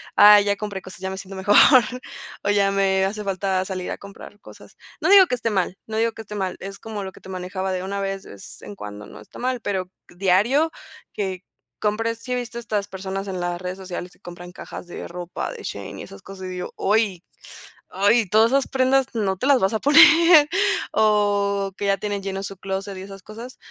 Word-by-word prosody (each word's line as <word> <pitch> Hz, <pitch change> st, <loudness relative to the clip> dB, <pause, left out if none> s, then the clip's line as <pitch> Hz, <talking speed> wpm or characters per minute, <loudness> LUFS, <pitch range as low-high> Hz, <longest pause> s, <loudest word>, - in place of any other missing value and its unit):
"Ay, 210 Hz, 0 st, +8 dB
ya 200 Hz, 0 st, +1 dB
compré 200 Hz, -2 st, -5 dB
cosas, 185 Hz, 0 st, -12 dB
y -, -, -14 dB
ya 190 Hz, -, -2 dB
me 190 Hz, -, -6 dB
siento 195 Hz, 0 st, -9 dB
mejor, 190 Hz, +2 st, +2 dB, 0.9 s
o 205 Hz, -, 0 dB
ya 200 Hz, -1 st, +3 dB
me 190 Hz, -1 st, +2 dB
hace 210 Hz, +2 st, -3 dB
falta 190 Hz, -1 st, -1 dB
salir 185 Hz, -2 st, -5 dB
a -, -, -4 dB
comprar 200 Hz, +1 st, -12 dB
cosas". -, -, -15 dB, 0.3 s
No -, -, +1 dB
digo 390 Hz, -2 st, +8 dB
que 250 Hz, -, 0 dB
esté 230 Hz, -2 st, -2 dB
mal, 190 Hz, -2 st, -1 dB
no 220 Hz, 0 st, -5 dB
digo 230 Hz, 0 st, +1 dB
que 225 Hz, -, -9 dB
esté 210 Hz, -, -10 dB
mal, 190 Hz, -3 st, -3 dB
es 195 Hz, +1 st, -8 dB
como 215 Hz, -2 st, -6 dB
lo 190 Hz, -, -6 dB
que -, -, -17 dB
te -, -, -13 dB
manejaba 185 Hz, +1 st, -4 dB
de 185 Hz, 0 st, -3 dB
una 200 Hz, +1 st, -4 dB
vez 195 Hz, 0 st, -4 dB
es 100 Hz, -, -12 dB
en 105 Hz, -, -9 dB
cuando, 105 Hz, 0 st, -9 dB
no 105 Hz, -, -12 dB
está 105 Hz, -, -14 dB
mal, 255 Hz, 0 st, -2 dB
pero 185 Hz, -3 st, -3 dB, 0.2 s
diario 205 Hz, -, +2 dB, 0.4 s
que 190 Hz, -2 st, -4 dB, 0.4 s
compres. 225 Hz, +2 st, -1 dB
¿Sí 250 Hz, +2 st, -4 dB
viste 245 Hz, -1 st, -5 dB
estas 210 Hz, -4 st, -3 dB
personas 195 Hz, 0 st, -5 dB
en 185 Hz, -2 st, -4 dB
las 175 Hz, 0 st, -3 dB
redes 180 Hz, 0 st, -5 dB
sociales 180 Hz, -1 st, -7 dB
que -, -, -24 dB
compran 175 Hz, -1 st, -10 dB
cajas 180 Hz, -, -9 dB
de -, -, -7 dB
ropa, 175 Hz, 0 st, -5 dB
de -, -, -10 dB
Shein -, -, -7 dB
y -, -, -6 dB
esas 100 Hz, -, -12 dB
cosas? 190 Hz, -1 st, -10 dB
Y 185 Hz, -, -5 dB
digo: 180 Hz, -1 st, -5 dB
"Oy, 200 Hz, -4 st, +1 dB, 0.7 s
ay, 205 Hz, +4 st, +2 dB
todas 220 Hz, +5 st, +4 dB
esas 275 Hz, 0 st, +2 dB
prendas 265 Hz, 0 st, +2 dB
no 200 Hz, -5 st, -1 dB
te 255 Hz, -, -3 dB
las 280 Hz, -3 st, +4 dB
vas 190 Hz, +3 st, +1 dB
a 220 Hz, -, 0 dB
poner", 320 Hz, +2 st, +7 dB, 0.4 s
o 205 Hz, -2 st, +2 dB
que 205 Hz, -, -3 dB
ya 200 Hz, 0 st, +3 dB
tienen 205 Hz, 0 st, -3 dB
lleno 195 Hz, 0 st, -4 dB
su 195 Hz, -1 st, -7 dB
clóset 195 Hz, +1 st, -5 dB
y -, -, -7 dB
esas 195 Hz, 0 st, -11 dB
cosas. 230 Hz, +4 st, -10 dB
195 Hz, 225 wpm, -22 LUFS, 190-220 Hz, 0.9 s, Ay